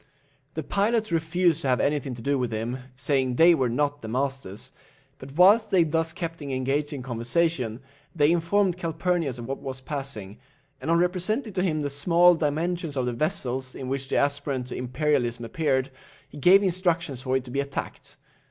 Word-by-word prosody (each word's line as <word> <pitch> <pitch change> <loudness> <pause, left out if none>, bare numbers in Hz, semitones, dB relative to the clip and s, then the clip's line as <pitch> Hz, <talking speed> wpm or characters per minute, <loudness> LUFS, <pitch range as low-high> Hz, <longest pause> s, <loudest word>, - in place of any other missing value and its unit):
The 160 - -3
pilots 215 +1 0
refused 165 0 +1
to 140 - -2
have 125 -1 +2
anything 140 -3 0
to 115 - -10
do 140 +2 +1
with 125 -2 -1
him, 115 +4 -3 0.2
saying 130 -1 0
they 170 +5 +7
were 130 -6 +1
not 145 +4 -1
the 110 - -7
masters; 130 -4 -3 0.5
but 135 +1 -10
whilst 200 +7 +5
they 185 -3 +4
thus 165 +1 0
kept 165 0 -5
him 140 - -6
engaged 135 +3 -1
in 140 -4 -5
conversation, 125 0 -1 0.3
they 150 -1 +4
informed 175 +2 +2
Calphurnius 165 -4 -1
of 120 - -7
what 135 +3 -4
was 130 -1 -6
passing, 130 -7 -6 0.4
and - - -4
on 165 - +4
representing 185 +7 0
to 185 - 0
him 155 -5 0
the 145 - -1
small 170 +5 +5
dimensions 160 0 -2
of 130 - 0
the 125 - -1
vessel 130 -2 -1
in 130 - -6
which 135 0 -3
the - - -2
aspirant 140 -2 0
to 125 - -6
imperialism 125 -2 0
appeared, 135 0 0 0.4
he 145 - -13
gave 190 +7 +6
instructions 170 -7 0
for 130 0 +1
it 130 - -4
to 125 - -10
be 140 - -1
attacked. 140 0 -5
145 Hz, 190 wpm, -26 LUFS, 130-170 Hz, 0.5 s, they